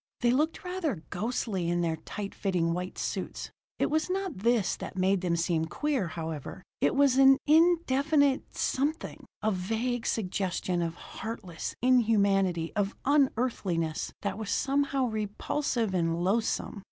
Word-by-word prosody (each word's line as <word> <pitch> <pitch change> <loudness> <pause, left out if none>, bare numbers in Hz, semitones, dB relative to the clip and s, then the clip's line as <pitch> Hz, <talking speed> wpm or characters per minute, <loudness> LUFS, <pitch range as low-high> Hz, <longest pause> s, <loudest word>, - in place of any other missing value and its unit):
They 240 - +4
looked 305 +6 0
rather 340 - -3
ghostly 195 -3 -2
in 175 0 +1
their 165 -2 0
tight 200 +5 -6
fitting 175 -4 0
white 180 +1 -4
suits. - - -4 0.3
It - - 0
was 315 +3 +1
not 380 - -2
this 225 -2 +2
that - - -7
made 190 0 +2
them 175 -2 +1
seem 165 -1 0
queer, 275 - -1
however: 160 -4 -6 0.2
it 145 - +2
was 275 -2 +4
an 270 0 +8
indefinite 300 -3 +3
something, 295 +5 -1 0.2
a 215 - +2
vague 225 +6 -2
suggestion 185 -3 -1
of 165 -1 -2
heartless 195 -7 -6
inhumanity, 200 -8 +3
of 205 0 0
unearthliness, 230 - +1
that 200 0 -2
was 215 -2 -5
somehow 275 -1 +1
repulsive 220 +1 -1
and 170 -1 0
loathsome. 215 +2 0
215 Hz, 140 wpm, -29 LUFS, 180-270 Hz, 0.3 s, an